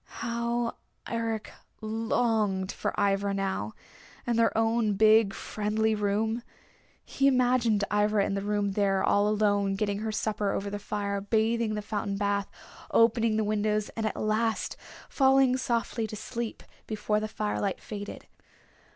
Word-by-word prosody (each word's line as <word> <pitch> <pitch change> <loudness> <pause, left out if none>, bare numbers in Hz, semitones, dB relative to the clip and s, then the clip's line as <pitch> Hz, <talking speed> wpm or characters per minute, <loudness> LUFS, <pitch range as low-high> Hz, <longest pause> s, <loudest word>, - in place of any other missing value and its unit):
How 235 0 -2 0.3
Eric 225 -2 -3 0.3
longed 220 -3 0
for - - -2
Ivra 200 0 +1
now, 190 - -2 0.5
and 240 - 0
their 230 -1 +3
own 225 -2 +2
big 215 0 +5
friendly 215 +2 -1
room. 215 +2 0 0.6
He 275 - +1
imagined 245 -5 +3
Ivra 210 -1 +3
in - - -2
the 195 - -1
room 205 0 0
there 195 -1 +1
all 205 0 +3
alone 205 -2 +2
getting 200 0 -1
her 220 0 -2
supper 210 -1 -1
over 200 0 -3
the 205 - -4
fire, 200 -1 -3
bathing 225 +2 +1
in 215 - -2
the 210 - -4
fountain 205 -1 -3
bath, 200 0 0 0.4
opening 230 -1 +3
the 220 - +2
windows, 210 0 0
and 225 -1 -2
at 215 - -4
last 220 +1 0 0.3
falling 265 -1 +4
softly 235 -3 -1
to 215 - -7
sleep 235 +1 -5 0.2
before 210 -1 0
the 215 - -3
firelight 210 -2 -2
faded. 205 -1 -7
215 Hz, 145 wpm, -28 LUFS, 205-225 Hz, 0.6 s, big